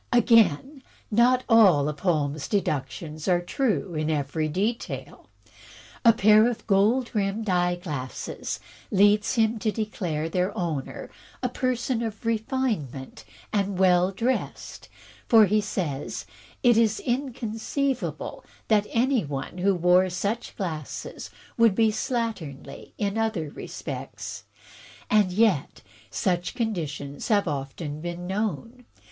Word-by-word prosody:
Again, 235 - +4 0.3
not 245 +4 +4
all 195 - +6
of 150 -1 -4
Holmes' 150 -4 0
deductions 155 -4 -2
are 180 -2 +4
true 180 - -1
in 155 0 -1
every 155 +1 -1
detail. 205 +9 -3 0.7
A 230 - +8
pair 215 +1 +5
of 240 - -6
gold 225 +5 +2
rimmed 210 +1 -1
eye 175 0 +2
glasses 145 -8 -5 0.3
leads 205 +3 +4
him 225 -1 +2
to 215 0 0
declare 180 -8 -3
their 180 +4 -1
owner 160 -6 -4 0.3
"a 250 - +1
person 250 -1 -1
of 225 -1 -5
refinement 220 - -2 0.3
and 200 -2 0
well 180 -1 +4
dressed," 230 +7 -3 0.4
for, 225 -2 +7
he 210 +2 +2
says 165 -9 -3 0.4
"it 240 -3 +5
is 220 -2 +3
inconceivable 255 +1 -2 0.3
that 210 -2 +3
any 250 0 +2
one 145 +4 -5
who 195 +1 +3
wore 180 +2 +4
such 205 +6 -3
glasses 160 -7 -5 0.3
could 230 -4 +5
be 225 0 +4
slatternly 215 - -4
in 205 +1 -1
other 205 -10 -1
respects." - - -7 0.7
And 210 -3 +4
yet, 195 -7 +1 0.3
such 175 - -1
conditions 155 - -3
have 205 -3 +2
often 145 +1 -4
been 175 +1 -5
known. 225 +5 -3
200 Hz, 120 wpm, -26 LUFS, 165-230 Hz, 0.7 s, A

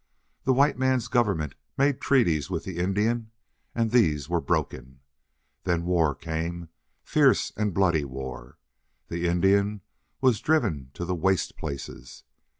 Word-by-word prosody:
The 130 - +4
white 140 0 +3
man's 130 -3 +1
government 100 - +1 0.2
made 140 0 +2
treaties 85 - +2
with 85 -4 -3
the 95 -3 -6
Indian, 110 +5 0 0.5
and 115 -2 0
these 75 - +3
were 85 0 0
broken. 65 -6 -3 0.6
Then 85 -1 0
war 85 -5 +2
came 85 +2 -4 0.3
fierce - - +3
and 105 -1 0
bloody 85 -4 +2
war. 65 -2 -7 0.5
The 85 +1 -1
Indian 100 +4 +2 0.4
was 130 -5 +3
driven 100 - +1
to 90 - -4
the 90 - -1
waste 95 +1 0
places. 70 -3 -7
90 Hz, 135 wpm, -26 LUFS, 80-110 Hz, 0.6 s, The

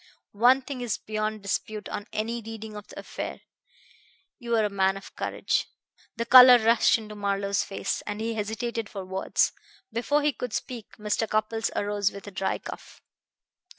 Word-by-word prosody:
One 250 +5 +4
thing 260 -2 -6
is 240 -4 -1
beyond 215 -1 -3
dispute 210 +1 -3
on 205 - -5
any 230 +2 -2
reading 220 -1 -8
of 210 -1 -9
the - - -13
affair: - - -6 1.0
you 235 -2 -1
are 220 -1 +3
a - - 0
man 195 0 +2
of 195 - -12
courage." - - -1 0.5
The 230 - -2
color 250 +1 +10
rushed 230 0 +4
into 215 -1 -9
Marlowe's 200 -1 0
face, 195 - -3
and 205 0 -3
he 225 +1 -2
hesitated 220 +1 -3
for 195 -2 -6
words. 190 +1 +1 0.4
Before 290 +6 +1
he 295 -1 +2
could 245 -1 -5
speak 240 -4 -5
Mr. 210 +1 -1
Cupples 220 +1 0
arose 205 -1 0
with 200 - -10
a 205 - -8
dry 190 0 -1
cough. - - -10
215 Hz, 170 wpm, -27 LUFS, 205-235 Hz, 1.0 s, color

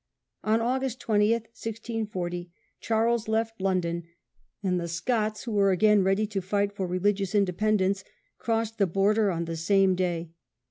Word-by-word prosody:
On 220 +1 +2
August 255 +1 -1
20, 210 -1 +3
1640, 220 -6 -4 0.3
Charles 225 0 +1
left 225 -1 -1
London, 170 -3 0 0.6
and 180 -2 +1
the 170 - -3
Scots, 215 +5 -1
who 235 - -5
were 200 -2 +3
again 205 +2 +4
ready 195 +3 +2
to 205 -2 -3
fight 200 +2 0
for 190 -2 -3
religious 195 +2 0
inde 195 -4 +2
pendence, 200 -2 +1 0.4
crossed 225 -1 -1
the 200 - +4
border 200 +4 +2
on 170 -2 -2
the 165 0 -4
same 195 +4 +3
Second 185 - 0
day. 175 -3 -2
205 Hz, 155 wpm, -27 LUFS, 185-220 Hz, 0.6 s, again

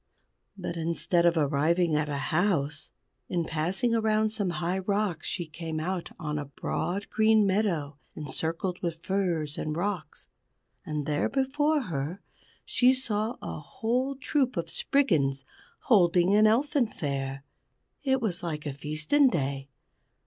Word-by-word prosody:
But 175 -2 -4
instead 170 +1 +1
of 170 0 +3
arriving 155 +3 +2
at 150 0 0
a 145 - -2 0.2
house, 155 -4 0 0.4
in 170 -2 0
passing 180 +10 0
around 220 -1 +2
some 210 -3 -1
high 175 +3 -1
rocks 195 -3 -1
she 175 - -1
came 160 0 -5
out 180 +2 -3
on 150 -3 -3
a 145 - -4
broad 180 +7 -3
green 220 -1 +4
meadow, 175 -8 0 0.2
encircled 165 +5 -3
with 165 -1 -3
furze 175 -6 -1
and 155 +1 -2
rocks. 180 -5 -3 0.6
And 150 -2 -3
there 150 0 0
before 290 +3 +1
her 165 - -3 0.5
she 255 +1 +4
saw 225 -2 -1
a 80 -1 -5
whole 250 - -1
troop 265 - 0
of 170 - -2
Spriggans 145 - +1 0.4
holding 180 -3 +4
an 215 +1 +6
Elfin 265 +3 +2
Fair. 135 -6 -4 0.6
It 265 -2 +1
was 190 -6 -1
like 155 -3 -4
a 145 - -3
feasten 155 - +2
day. 140 - -2
175 Hz, 140 wpm, -28 LUFS, 155-215 Hz, 0.6 s, an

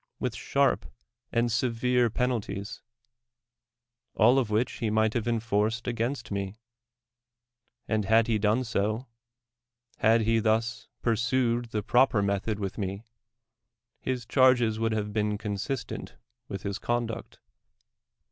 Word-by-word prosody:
with - - -2
sharp - - +1 0.4
tind 120 0 +1
severe 120 +1 +2
penalties; 110 -4 -2 1.3
all 120 +5 +5
of 120 -5 -1
which 110 +4 0
he 115 - 0
might 110 0 +2
luive 120 0 0
(ufrr 110 0 +1
u'd 115 - -14
against 120 +1 -2
me; 100 +1 -3 1.3
and 110 -2 0
had 110 +2 +4
ha 110 -2 +1
done 110 +4 +2
so 110 +1 -1 0.5
— 120 0 -42
had 115 +1 +5
he 115 +1 +2
thns 115 +1 0 0.2
pursued 120 +1 +1
the 110 -2 -3
proper 120 -3 +3
method 100 +2 -1
with 100 +1 -4
me, 100 +2 -4 0.9
his 125 -2 -3
chcrgis 120 -3 +4
would 115 0 +1
have 105 -1 -2
been 105 -1 0
consistent 105 +4 -4 0.3
with 95 -1 -6
his 100 -1 -3
conduct. 120 -2 -3
115 Hz, 130 wpm, -28 LUFS, 105-120 Hz, 1.3 s, all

